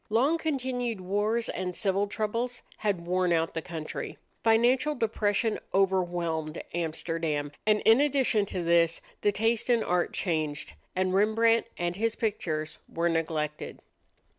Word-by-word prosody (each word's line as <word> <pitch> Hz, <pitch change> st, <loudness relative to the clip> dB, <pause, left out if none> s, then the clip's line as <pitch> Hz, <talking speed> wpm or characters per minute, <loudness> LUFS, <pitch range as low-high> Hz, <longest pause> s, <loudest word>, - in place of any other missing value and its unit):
Long 270 Hz, +10 st, +3 dB
continued 250 Hz, -7 st, -2 dB
wars 205 Hz, +5 st, 0 dB
and 180 Hz, -1 st, -3 dB
civil 200 Hz, 0 st, +1 dB
troubles 230 Hz, +4 st, -2 dB
had 195 Hz, -5 st, -1 dB
worn 180 Hz, 0 st, +1 dB
out 165 Hz, -1 st, +1 dB
the 165 Hz, -, -2 dB
country. 160 Hz, -2 st, -6 dB, 0.3 s
Financial 245 Hz, +6 st, +3 dB
depression 220 Hz, -2 st, 0 dB, 0.2 s
overwhelmed 175 Hz, -5 st, 0 dB
Amsterdam; 160 Hz, -3 st, -2 dB, 0.2 s
and 210 Hz, -1 st, +4 dB
in 225 Hz, +5 st, +6 dB
addition 265 Hz, -8 st, +2 dB
to 180 Hz, -, -3 dB
this 170 Hz, 0 st, +3 dB, 0.2 s
the 205 Hz, -, +3 dB
taste 225 Hz, +3 st, 0 dB
in 235 Hz, -2 st, +4 dB
art 180 Hz, 0 st, +1 dB
changed, 155 Hz, -, -2 dB, 0.2 s
and 185 Hz, 0 st, +1 dB
Rembrandt 225 Hz, +3 st, +3 dB
and 175 Hz, +1 st, -2 dB
his 225 Hz, +1 st, 0 dB
pictures 160 Hz, -8 st, -2 dB
were 170 Hz, +1 st, 0 dB
neglected. 155 Hz, -2 st, -2 dB
195 Hz, 135 wpm, -28 LUFS, 170-225 Hz, 0.3 s, in